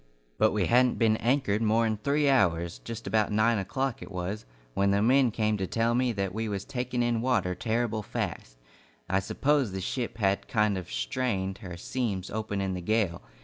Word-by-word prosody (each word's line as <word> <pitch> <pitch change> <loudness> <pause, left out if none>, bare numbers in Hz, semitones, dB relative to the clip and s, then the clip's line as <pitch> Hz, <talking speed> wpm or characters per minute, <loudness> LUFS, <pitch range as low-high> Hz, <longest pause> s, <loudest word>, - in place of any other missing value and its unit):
But - - +4
we 105 -3 +1
hadn't 125 +5 +3
been 110 -2 +3
anchored 115 -4 +1
more 115 +1 +3
'n 110 -1 0
three 145 +2 +2
hours 85 - +2
just 115 - -7
about 110 -2 +1
nine 110 +1 +3
o'clock 130 +6 -2
it - - -8
was 90 - -4 0.3
when 100 +6 +2
the 100 0 +3
men 125 +4 +4
came 110 -1 0
to 95 -1 -2
tell 115 +3 +1
me 125 0 +2
that 100 -3 -2
we 110 +1 -2
was 100 -1 -3
taking 125 -1 -2
in 120 -1 +1
water 105 -8 +1
terrible 115 +3 -1
fast. - - -5 0.5
I 95 +1 +2
suppose 135 +3 +1
the 95 - -3
ship 120 +6 -3
had 100 -3 0
kind 105 -3 +2
of 90 -3 -6
strained 95 - -2
her 90 -3 -8
seams 100 -2 -3
open 105 -2 -2
in 95 -1 -1
the 90 - -4
gale. 100 -3 0
110 Hz, 195 wpm, -28 LUFS, 95-120 Hz, 0.5 s, But